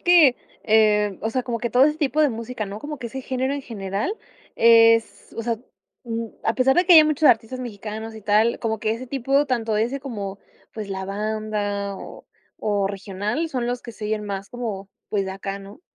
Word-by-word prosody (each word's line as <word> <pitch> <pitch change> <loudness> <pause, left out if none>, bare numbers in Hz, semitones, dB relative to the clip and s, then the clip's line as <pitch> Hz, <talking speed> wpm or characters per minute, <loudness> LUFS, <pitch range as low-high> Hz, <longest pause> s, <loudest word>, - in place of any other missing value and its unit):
que, 335 -8 +6 0.3
eh, 210 -2 +3
o 220 - -1
sea, 255 +2 -1
como 235 -2 -3
que 235 +1 -2
todo 250 +4 +6
ese 300 +1 +1
tipo 300 0 +1
de 300 - +5
música, 230 -1 -5
¿no? 200 +1 -6
Como 295 +5 -6
que 235 - -5
ese 265 +3 -6
género 260 +1 -1
en 285 - -4
general 205 - -3 0.4
es 230 0 +4
o 230 - -3
sea, 230 -1 -1 0.5
mm, 230 -1 -3 0.2
a 225 - +1
pesar 265 +1 +3
de 355 - +5
que 355 - +8
ya 320 - +11
hay - - +5
muchos 305 0 +3
artistas 240 +2 +2
mexicanos 220 -1 -6
y 220 - -10
tal, 215 +3 +3
como 220 -1 -2
que 215 +1 0
ese 250 +3 -6
tipo, 275 +3 +1
tanto 230 -4 0
ese 240 +6 0
como, 205 -7 -5 0.3
pues, 215 -2 -6
la 190 -1 -4
banda 205 -1 -2
o - - -11 0.3
o 205 -2 0
regional, 205 - -3
son 250 -4 -2
los 245 0 -2
que 235 - -9
se 210 0 -6
oyen 215 0 -2
más 195 -1 -5
como, 215 -6 -5 0.2
pues, 200 -2 0
de - - -3
acá, 195 +1 -5
¿no? 200 +7 -12
225 Hz, 215 wpm, -23 LUFS, 205-255 Hz, 0.5 s, ya